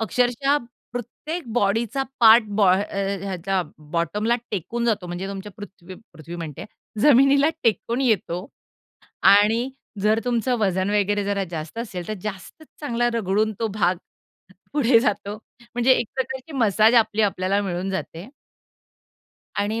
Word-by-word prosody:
अक्षरशः 250 +5 +1 0.4
प्रत्येक 275 +8 -5
बॉडीचा 230 +4 +1 0.2
पार्ट 225 0 +8
बा 195 -4 +5
ह 200 - 0
अ, 195 -1 -2
ह्याच्या 190 -1 -1 0.3
बॉटमला 210 +8 0
टेकून 230 +5 -3
जातो 210 -6 0
म्हणजे 175 +2 -5
तुमच्या 200 +1 -7
पृथ्वी 190 -3 -11 0.2
पृथ्वी 165 +1 -9
म्हणते 165 -2 -7
आहे, 210 +1 -12
जमिनीला 275 +1 +5
टेकून 230 +3 0
येतो. 200 -7 0 0.8
आणि 225 +6 +5 0.3
जर 215 +1 +3
तुमचं 245 +1 0
वजन 190 -2 0
वगैरे 205 0 +1
जरा 200 -1 -1
जास्त 160 +5 -6
असेल, 185 -7 -5
तर 215 - -2
जास्तच 210 - -8
चांगला 240 -4 0
रगडून 215 0 +1
तो 225 - +1
भाग 185 -3 +2 0.8
पुढे 260 -5 +4
जातो. 205 -3 -1 0.4
म्हणजे 245 +2 +4
एक 240 - +1
प्रकारची 265 +3 -4
मसाज 220 0 +4
आपली 220 -2 +3
आपल्याला 195 0 +1
मिळून 185 0 -3
जाते 190 -1 -5 1.3
आणि 215 +3 -1
210 Hz, 135 wpm, -23 LUFS, 195-240 Hz, 1.3 s, पार्ट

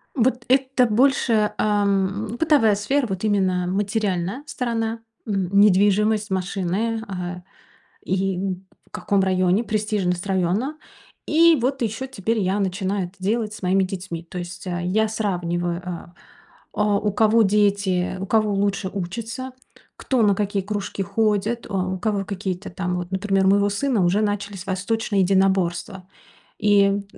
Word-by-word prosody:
Вот 250 -1 +1
это 260 -1 +3
больше, 230 -2 +2
эм, 205 +1 0
бытовая 280 -9 +4
сфера, 250 +6 0
вот 190 0 -4
именно 190 -4 +1
материальная 200 +2 -1
сторона: 230 -4 -2 0.3
м, 195 -4 -1
недвижимость, 210 +1 +3
машины, 190 +4 -1
э, 180 -1 -5 0.6
и 190 0 0
н 190 0 -4 0.2
в - - -28
каком 200 -1 0
районе, 185 +3 +2
престижность 210 -4 -1
района. 195 - 0 0.5
И 330 +1 +5
вот 265 +2 -1
ещё 225 +4 -2
теперь 225 -3 -2
я 195 0 0
начинаю 190 0 -1
это 185 - -22
делать 215 +3 -1
с - - -10
моими 190 +1 +2
детьми. 185 -3 -5
То 175 +2 -8
есть, 175 +1 -7
э, 175 0 -3
я 215 +4 +1
сравниваю, 175 -5 -2
э, 175 -1 -7 0.6
а, 210 -1 +2
у 205 0 -1
кого 220 +2 +4
дети, 200 -3 +1
у 195 - -4
кого 215 0 +2
лучше 195 -1 -1
учатся, 230 +7 -5 0.4
кто 260 -3 -1
на 205 -2 +4
какие 200 -1 -1
кружки 205 0 -4
ходит, 215 +3 0
а, 200 - -4
у 185 0 -3
кого 200 0 -1
какие-то 190 -1 -4
там 180 0 -3
вот, 175 0 -5
например, 195 0 +1
у - - +6
моего 200 +1 +3
сына 220 -1 +1
уже 180 +4 +2
начались 205 -3 -3
восточные 200 +2 0
единоборства. 190 0 +1 0.5
И, 205 -1 +4
м, 200 0 0
200 Hz, 150 wpm, -22 LUFS, 185-220 Hz, 0.6 s, у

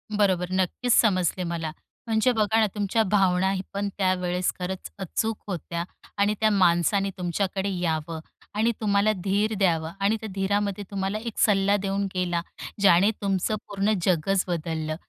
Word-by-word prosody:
बरोबर, 190 -4 +2
नक्कीच 190 +6 +1
समजले 185 -5 +3
मला. 170 -2 -3 0.4
म्हणजे 225 +3 +3
बघा 220 -1 +2
ना, 220 - +4
तुमच्या 210 +2 +1
भावनाही 190 -1 +2
पण 200 +1 -1
त्यावेळेस 180 -2 +1
खरंच 185 +1 -4
अचूक 215 +4 -2
होत्या 170 -2 -4 0.3
आणि 200 +1 +3
त्या 220 - +4
माणसाने 195 0 +3
तुमच्याकडे 190 +2 -1
यावं 160 -1 -2 0.4
आणि 225 +3 +2
तुम्हाला 205 0 +3
धीर 205 +3 +1
द्यावं 165 -4 +1
आणि 200 +3 +2
त्या 220 - -5
धीरामध्ये 200 +1 0
तुम्हाला 195 +1 -2
एक 230 0 -6
सल्ला 200 -1 +4
देऊन 200 0 -1
गेला, 175 -2 0 0.4
ज्याने 190 0 +6
तुमचं 195 +1 0
पूर्ण 200 +1 0
जगच 185 +2 +2
बदललं. 160 -2 -2
195 Hz, 145 wpm, -25 LUFS, 180-205 Hz, 0.4 s, ज्याने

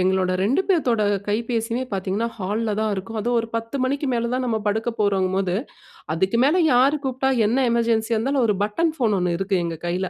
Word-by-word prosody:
எங்களோட 185 0 +1
2 240 - +2
பேத்தோட 255 - +2 0.3
கைபேசியுமே 230 +3 -1
பாத்தீங்கன்னா, 195 +4 -1
ஹால்ல 210 +4 -2
தான் 220 0 0
இருக்கும். 195 +4 -5
அதுவும் 240 +2 +1
ஒரு 225 - -6
10 230 +4 -4
மணிக்கு 280 +3 -1
மேல 235 -1 -1
தான் 255 0 -1
நம்ம 225 -2 0
படுக்க 220 +3 0
போறங்கும்போது, 190 -2 +1 0.6
அதுக்கு 190 +7 +1
மேல 305 +7 +3
யார் 260 +4 +4
கூப்பிட்டா 265 +1 0 0.2
என்ன 255 +4 +2
எமர்ஜென்சியா 230 -1 +1
இருந்தாலும், 265 +4 +1
ஒரு 210 - +2
பட்டன் 315 +11 0
ஃபோன் 225 -7 +2
ஒண்ணு 180 -1 0
இருக்கு 195 0 0
எங்க 165 -1 -4
கையில, 180 +2 -1
225 Hz, 185 wpm, -22 LUFS, 195-245 Hz, 0.6 s, யார்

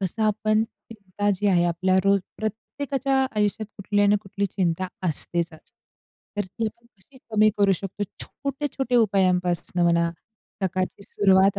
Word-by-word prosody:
कसं 195 +3 -2
आपण 215 0 +2
चिंता 205 -3 -4
जी 205 +3 -1
आहे, 175 -3 +4
आपल्या 185 +2 +2
रोज 200 0 +4 0.2
प्रत्येकाच्या 265 +5 -1
आयुष्यात 210 +1 +1
कुठली 205 0 0
ना 205 +1 +5
कुठली 200 0 -2
चिंता 185 -1 -1 0.2
असतेतच, 165 +1 -3 0.6
तर 205 - 0
ती 220 +4 -3
कशी 235 +3 -21
कमी 215 0 +5
करू 200 -1 +5
शकतो. 195 +2 -3 0.2
छोटे-छोटे 275 -2 -3
उपायांपासून 180 -4 +2
म्हणा, 170 0 +3 0.5
सकाळची 185 +1 -1
सुरुवात 195 0 +4
200 Hz, 130 wpm, -25 LUFS, 185-215 Hz, 0.6 s, ना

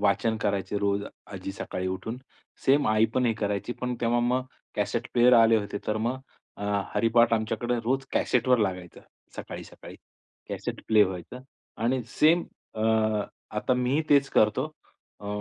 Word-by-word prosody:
वाचन 105 +2 +2
करायचे 100 -1 -1
रोज 100 0 0 0.3
आजी 95 0 -6
सकाळी 95 -1 -4
उठून. 105 +5 -4 0.5
सेम 140 +2 +4
आई 110 +1 +4
पण 125 -1 +2
हे 115 - +3
करायची. 105 +1 -2
पण 125 0 -2
तेव्हा 120 +1 +2
मग 125 +2 +1 0.3
कॅसेट - - -1
प्लेयर 120 +1 +6
आले 115 -1 +6
होते, 100 -1 -3
तर 110 - 0
मग 120 +4 -1 0.4
अ, 105 - -6 0.3
हरिपाठ 115 0 +4
आमच्याकडे 115 +2 0
रोज 135 +3 0
कॅसेटवर 125 0 +2
लागायचं 90 -4 -3 0.4
सकाळी-सकाळी. - - -9 0.5
कॅसेट - - -5
प्ले 110 -1 +6
व्हायचं 95 +6 -6 0.4
आणि 125 +2 +1 0.2
सेम 165 +3 +5 0.3
अ, 110 - -3 0.8
आता 115 +4 +1
मीही 125 +5 +1
तेच 140 -1 +5
करतो. 105 +6 +3 0.5
अ, 100 - -9
115 Hz, 150 wpm, -27 LUFS, 100-125 Hz, 0.8 s, प्लेयर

